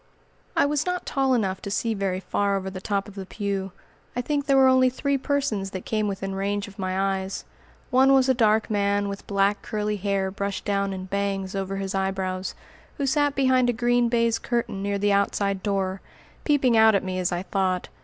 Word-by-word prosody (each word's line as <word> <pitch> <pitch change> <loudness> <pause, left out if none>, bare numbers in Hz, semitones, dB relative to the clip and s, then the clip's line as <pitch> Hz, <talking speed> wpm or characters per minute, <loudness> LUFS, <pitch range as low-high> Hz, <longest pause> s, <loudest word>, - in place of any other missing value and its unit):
I - - +5
was 295 0 +1
not 360 0 -2
tall 270 -2 +1
enough 195 -5 -1
to - - -5
see 225 +3 0
very 195 -3 -1
far 200 +1 0
over 190 0 -4
the 185 -1 -7
top 200 0 -1
of 205 - -11
the 195 -2 -7
pew. 195 -2 -3 0.4
I 245 - 0
think 285 +2 -2
there 275 -1 +4
were 265 - +7
only 260 0 +5
three 280 +2 -1
persons 270 -8 -1
that 185 -1 -7
came 215 -1 0
within 195 -1 -3
range 200 +1 -2
of 200 0 -14
my 190 +1 0
eyes. 190 +1 -6 0.5
One 265 +1 +5
was 265 -1 +5
a 260 - +4
dark 220 -3 +2
man 200 -1 +1
with 200 0 -7
black 200 0 +1
curly 210 0 -2
hair 195 -1 -1
brushed 200 0 -4
down 200 -1 0
in 185 -1 -5
"bangs" 195 0 -2
over 195 0 -3
his 195 0 -3
eyebrows, 190 -1 -2 0.4
who 280 - -1
sat 290 +1 +2
behind 260 -2 +3
a - - +2
green 240 +1 +2
baize 230 -1 +2
curtain 235 -5 -2
near 200 0 -1
the 205 0 +2
outside 200 -1 +1
door, 195 -2 -1 0.4
peeping 270 -5 +3
out 220 -1 +6
at 195 - +1
me, 185 -1 -3
as 180 0 0
I 175 +1 -2
thought. 190 -2 -1
200 Hz, 210 wpm, -25 LUFS, 195-245 Hz, 0.5 s, were